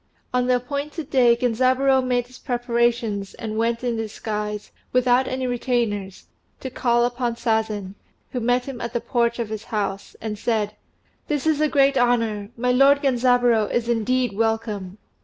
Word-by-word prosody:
On 250 0 +1
the 250 - +4
appointed 285 +4 -4
day 245 -3 +5
Genzaburô 255 +3 +2
made 245 -1 0
his 250 0 -15
preparations, 235 -5 -1
and 220 -1 -5
went 230 +2 0
in 240 -2 -1
disguise, 210 -1 -4 0.2
without 250 +1 +3
any 260 0 -2
retainers, 235 -6 -2 0.3
to 260 - -6
call 240 -1 +2
upon 240 -1 -2
Sazen, 220 -4 -1 0.4
who 250 - -2
met 245 +1 +1
him 265 -3 -7
at 235 0 -4
the 240 - 0
porch 235 -1 0
of 230 -3 -3
his 220 0 -5
house, 200 -2 -3
and 210 -1 -5
said, 215 -2 -1 0.5
"This 295 -2 -1
is 310 -2 +2
a 305 - +3
great 275 -1 +3
honour! 230 -4 +1
My 250 +1 +1
lord 275 +3 +5
Genzaburô 245 -4 +3
is 235 -1 0
indeed 240 0 +1
welcome. 215 -3 -2
240 Hz, 160 wpm, -23 LUFS, 220-255 Hz, 0.5 s, day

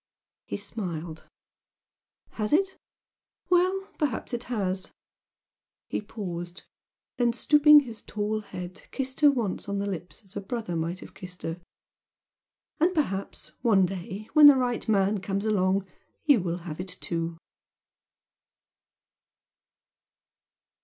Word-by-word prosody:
He - - -3
smiled. 175 -6 -6 1.1
"Has 215 +4 -2
it? 380 +4 +3 0.8
Well, 370 +2 +3
perhaps 275 -4 -1
it 240 0 -3
has!" 190 -5 -2 1.0
He - - -1
paused 180 -4 -6 0.5
then 240 -1 +3
stooping 295 +4 +7
his 230 -5 -8
tall 210 +1 -2
head 180 -3 -8
kissed 265 -1 -4
her 295 -2 +8
once 230 -7 -2
on 200 - -1
the 200 - -1
lips 185 +1 -6
as 195 0 -18
a 205 - -3
brother 215 -4 -4
might 165 +3 -2
have - - -11
kissed 180 -1 -10
her. 165 +2 -4 1.2
"And 355 +4 +3
perhaps 200 - -2
one 210 -6 +5
day 190 +3 -6
when 300 -2 +10
the 290 - +9
right 245 -3 -1
man 200 0 +3
comes 195 +2 -2
along, 195 -2 +2 0.4
you 285 -9 +5
will 175 -1 -2
have 155 -2 -6
it 185 0 -6
too!" 165 -1 -3
205 Hz, 125 wpm, -27 LUFS, 185-245 Hz, 1.2 s, when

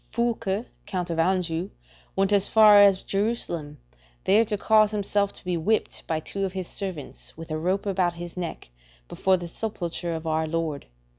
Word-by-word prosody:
Foulke, 230 -3 -1 0.2
Count 180 -3 -3
of 165 - -2
Anjou, 180 0 0 0.5
went 195 +1 +2
as 200 -1 +4
far 210 -2 +7
as 195 -2 +5
Jerusalem, 195 -8 -2 0.5
there 210 +4 +5
to 210 -1 -2
cause 215 0 +4
himself 205 -1 0
to - - -14
be 180 -1 0
whipped 215 +7 -1
by 160 -1 0
two 195 +5 -5
of 190 -1 -2
his 185 -2 -4
servants, 185 -9 -6
with 165 0 -9
a 155 - -1
rope 185 +5 0
about 185 -3 0
his 175 0 -8
neck, 170 - -6 0.4
before 190 - +2
the 175 -1 -6
sepulchre 175 -3 -4
of 160 0 -6
our 160 0 0
Lord. 160 -3 -3
185 Hz, 175 wpm, -25 LUFS, 165-205 Hz, 0.5 s, far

